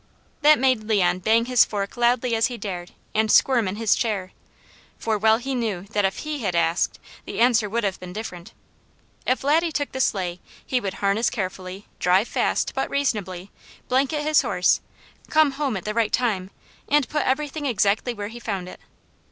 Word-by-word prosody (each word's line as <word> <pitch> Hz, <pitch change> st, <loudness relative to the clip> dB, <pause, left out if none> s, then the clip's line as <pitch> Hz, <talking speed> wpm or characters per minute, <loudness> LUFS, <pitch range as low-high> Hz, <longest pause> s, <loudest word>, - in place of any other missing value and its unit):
That 300 Hz, 0 st, +7 dB
made 255 Hz, -4 st, +2 dB
Leon 185 Hz, -5 st, +2 dB
bang 225 Hz, +5 st, +3 dB
his 250 Hz, -1 st, +5 dB
fork 200 Hz, -2 st, -4 dB
loudly 240 Hz, 0 st, +2 dB
as 225 Hz, 0 st, +3 dB
he 245 Hz, -2 st, -6 dB
dared 185 Hz, -4 st, -6 dB, 0.2 s
and 220 Hz, 0 st, +2 dB
squirm 240 Hz, -6 st, +4 dB
in 185 Hz, -, -3 dB
his 225 Hz, -1 st, +2 dB
chair, 200 Hz, -5 st, -2 dB, 0.7 s
for 220 Hz, -1 st, -1 dB
well 220 Hz, +1 st, +4 dB
he 265 Hz, +3 st, -4 dB
knew 225 Hz, -8 st, -2 dB
that 205 Hz, -2 st, +1 dB
if 195 Hz, -, -2 dB
he 305 Hz, -1 st, -3 dB
had 195 Hz, -7 st, -2 dB
asked, 170 Hz, +1 st, +1 dB, 0.3 s
the -, -, -6 dB
answer 230 Hz, -3 st, +3 dB
would 235 Hz, +2 st, -1 dB
have 195 Hz, -2 st, -1 dB
been 180 Hz, 0 st, -8 dB
different. 190 Hz, -1 st, -7 dB, 0.8 s
If 255 Hz, -, +1 dB
Laddie 320 Hz, +4 st, +2 dB
took 290 Hz, -1 st, -2 dB
the 265 Hz, -, -5 dB
sleigh 180 Hz, -6 st, -1 dB, 0.3 s
he 255 Hz, -1 st, 0 dB
would 195 Hz, -2 st, -4 dB
harness 200 Hz, +4 st, +2 dB
carefully, 190 Hz, -2 st, -5 dB
drive 185 Hz, +5 st, +3 dB
fast, -, -, 0 dB
but -, -, -2 dB
reasonably, 200 Hz, -9 st, -2 dB, 0.4 s
blanket 275 Hz, +4 st, +1 dB
his 310 Hz, 0 st, +4 dB
horse, -, -, +2 dB, 0.5 s
come 310 Hz, -2 st, +4 dB
home 270 Hz, -5 st, -2 dB
at 180 Hz, -, -8 dB
the 215 Hz, -, -2 dB
right 225 Hz, -1 st, +1 dB
time, 210 Hz, -7 st, 0 dB, 0.4 s
and 290 Hz, -3 st, +3 dB
put 300 Hz, -1 st, -1 dB
everything 290 Hz, +2 st, -1 dB
exactly 220 Hz, 0 st, +1 dB
where 205 Hz, -1 st, -5 dB
he 235 Hz, +1 st, -9 dB
found 195 Hz, -6 st, -4 dB
it. -, -, -10 dB
220 Hz, 185 wpm, -23 LUFS, 195-255 Hz, 0.8 s, That